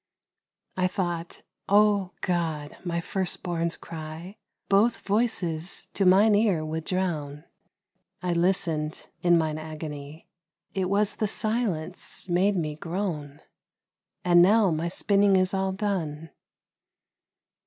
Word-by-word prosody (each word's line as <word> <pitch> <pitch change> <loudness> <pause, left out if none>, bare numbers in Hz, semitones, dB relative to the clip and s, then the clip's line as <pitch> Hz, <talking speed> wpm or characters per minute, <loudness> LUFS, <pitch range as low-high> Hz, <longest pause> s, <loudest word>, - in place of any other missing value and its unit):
I 185 0 +2
thought, 175 -2 -4 0.3
O 205 -2 +4
God! 160 -5 -2
my 170 -2 -2
first 190 +1 -3
born's 170 -2 -1
cry 165 +4 -8 0.3
Both 215 +4 +3
voices 195 -6 0
to 195 - +2
mine 200 +4 +6
ear 205 -7 +2
would 160 +1 -4
drown: 155 -6 -2 0.8
I 180 -1 0
listened 170 -3 0
in 175 -1 +5
mine 155 -1 -1
agony, 155 -1 -8 0.5
It 185 -1 -1
was 205 +1 +1
the 215 - 0
silence 195 -7 -2
made 190 +3 +2
me 155 -4 -2
groan! 155 -4 -4 0.8
And 175 -1 +6
now 200 +1 +5
my 160 +2 -1
spinning 200 +2 +3
is 185 0 +2
all 190 0 0
done. 170 -6 -3
175 Hz, 115 wpm, -26 LUFS, 160-195 Hz, 0.8 s, mine